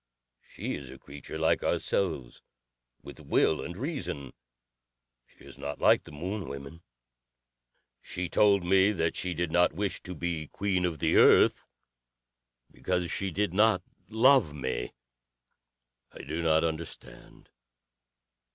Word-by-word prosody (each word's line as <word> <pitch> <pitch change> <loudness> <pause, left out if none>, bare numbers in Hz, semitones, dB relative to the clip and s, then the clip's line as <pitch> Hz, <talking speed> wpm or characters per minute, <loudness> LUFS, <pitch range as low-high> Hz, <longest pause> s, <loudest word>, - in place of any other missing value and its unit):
She - - -6
is 70 -3 -7
a - - -10
creature 70 +2 -9
like 80 0 +2
ourselves 80 -11 -1 0.6
with - - -11
will 80 - +1
and 85 - -7
reason. 125 - -5 0.9
She - - -20
is - - -13
not 70 +1 -5
like - - +4
the - - -12
Moon 90 +6 -5
women. 70 +4 -9 1.2
She 90 0 -4
told 100 +1 +3
me 95 +3 +4
that 80 -3 -1
she 90 -2 -2
did 85 0 -2
not 90 0 +3
wish 100 +3 -3
to 90 - -8
be 80 -2 -3
queen 95 0 -1
of 85 -3 -2
the - - +1
Earth - - +6 1.1
because 90 -2 -2
she 100 - -2
did 100 +1 -1
not 105 -2 +3 0.3
love 115 - +4
me. 65 -3 -3 1.2
I - - -11
do 80 +5 -4
not 80 -1 +3
understand. 80 0 -7
85 Hz, 135 wpm, -28 LUFS, 75-95 Hz, 1.2 s, Earth